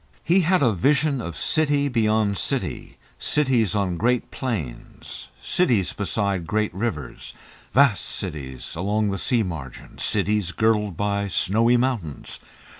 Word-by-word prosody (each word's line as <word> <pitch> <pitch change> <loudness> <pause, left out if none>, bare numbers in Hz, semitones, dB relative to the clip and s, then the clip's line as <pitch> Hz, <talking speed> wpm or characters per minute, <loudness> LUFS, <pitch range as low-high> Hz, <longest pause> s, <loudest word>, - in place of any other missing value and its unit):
He 175 +4 +4
had 180 -2 +3
a 120 -4 +4
vision 140 - +2
of 85 -7 -6
city 145 -2 +2
beyond 110 -5 +1
city; - - -3 0.2
cities 125 -8 +1
on 95 -4 0
great 125 +5 0
plains, 95 - -6
cities 120 - +2
beside 100 -4 -2
great 110 -2 0
rivers, 75 - -4 0.4
vast 135 -7 +4
cities 65 -4 -6
along 105 +4 0
the 100 -1 -2
sea 120 +1 +1
margin, 75 -10 -8
cities 105 -4 0
girdled 105 -5 +1
by 100 0 0
snowy 115 +6 +2
mountains. 120 - -3
105 Hz, 125 wpm, -23 LUFS, 90-125 Hz, 0.4 s, He